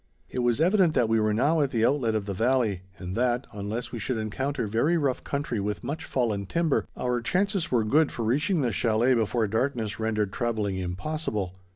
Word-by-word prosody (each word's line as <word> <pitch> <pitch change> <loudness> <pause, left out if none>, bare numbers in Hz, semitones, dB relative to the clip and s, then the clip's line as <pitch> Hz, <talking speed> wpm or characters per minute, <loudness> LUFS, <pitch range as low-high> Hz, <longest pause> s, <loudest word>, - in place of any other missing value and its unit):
It - - -3
was 120 +1 +2
evident 180 -1 +3
that 120 -4 +3
we 115 0 +3
were 110 0 +2
now 145 +9 +2
at 140 - +1
the 115 -3 +1
outlet 125 -5 +1
of 105 -2 -1
the 100 - -3
valley, 115 -3 +1 0.2
and 90 0 -6
that, 125 +1 +1
unless 105 +4 -4
we 120 - -5
should 120 +3 -2
encounter 130 +5 -2
very 120 +11 +2
rough 140 -5 0
country 140 -5 -2
with 105 +1 -3
much 145 +6 -4
fallen 105 -6 -1
timber, 165 - +1
our 125 -1 -1
chances 190 - 0
were 120 -3 +3
good 145 +7 +3
for 115 - -3
reaching 150 - +1
the 120 -3 +1
chalet 115 +3 +2
before 115 0 +1
darkness 115 0 -1
rendered 110 -3 -1
travelling 110 -5 -1
impossible. 95 - -3
120 Hz, 200 wpm, -27 LUFS, 110-140 Hz, 0.2 s, evident